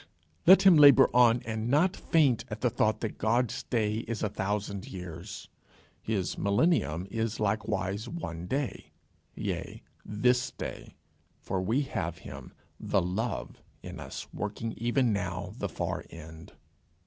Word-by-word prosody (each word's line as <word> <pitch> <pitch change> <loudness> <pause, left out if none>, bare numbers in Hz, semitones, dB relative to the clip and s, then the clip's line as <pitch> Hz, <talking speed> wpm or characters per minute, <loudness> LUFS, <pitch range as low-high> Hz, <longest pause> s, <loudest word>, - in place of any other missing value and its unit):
Let 190 +2 +9
him 190 -4 +8
labour 145 -3 +8
on, 120 -1 +5
and 110 +1 -3
not 155 +8 +3
faint 135 -8 +2
at 110 0 -6
the 125 - +2
thought 110 -1 +1
that 110 - -4
God's 115 +2 +1
day 110 -3 -1
is 115 -2 -3
a 105 - +1
thousand 100 0 -3
years: 90 +1 -8 0.5
his 100 -5 -2
millennium 100 - +1
is 115 0 -2
likewise 105 0 -1
one 85 - -6
day 135 +2 -3 0.4
yea, - - -4 0.2
this 125 +4 +1
day, - - -8 0.4
for 95 - -3
we 115 +10 +1
have 85 - -3
him, - - -10 0.3
The - - +1
Love, 90 - -3 0.2
in 90 -1 -8
us, 65 -3 -7
working 105 +2 -4
even 120 0 +1
now 95 -3 -3
the - - -2
far - - -3
end. 80 -1 -11
110 Hz, 140 wpm, -29 LUFS, 95-125 Hz, 0.5 s, Let